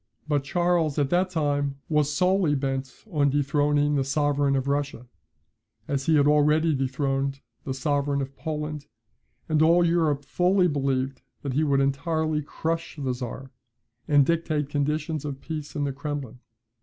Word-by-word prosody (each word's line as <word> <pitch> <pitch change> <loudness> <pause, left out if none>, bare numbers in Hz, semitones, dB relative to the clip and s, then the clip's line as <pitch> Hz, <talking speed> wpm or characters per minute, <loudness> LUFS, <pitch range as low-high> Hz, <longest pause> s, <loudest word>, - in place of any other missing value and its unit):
But 145 -2 +1
Charles 175 -1 +1
at 145 -2 +1
that 180 +2 +2
time 145 -4 0
was 150 -2 +2
solely 180 -1 +2
bent 135 -1 -2 0.2
on 145 -4 +2
dethroning 145 +1 +2
the 140 -2 +2
sovereign 145 0 +1
of 135 0 -1
Russia, 140 -3 -2 0.8
as 135 -1 -2
he 160 - +4
had 145 -2 +4
already 150 +2 +4
dethroned 135 0 -1 0.3
the 135 - -2
sovereign 140 +1 0
of 135 0 -5
Poland, 150 -2 -4 0.6
and 155 -1 +2
all 170 +2 +5
Europe 160 -4 +1
fully 180 +5 +3
believed 135 -3 -1 0.2
that 140 -2 -2
he 150 +4 +2
would 140 -2 +2
entirely 155 +3 0
crush 160 +3 -3
the 135 -3 -1
Czar, 125 +2 -7 0.6
and 145 -2 +5
dictate 155 -3 0
conditions 150 +1 -1
of 140 -2 -5
peace 155 -2 -6
in 145 - -1
the 140 -1 -1
Kremlin. 140 -4 -5
145 Hz, 155 wpm, -26 LUFS, 140-155 Hz, 0.8 s, all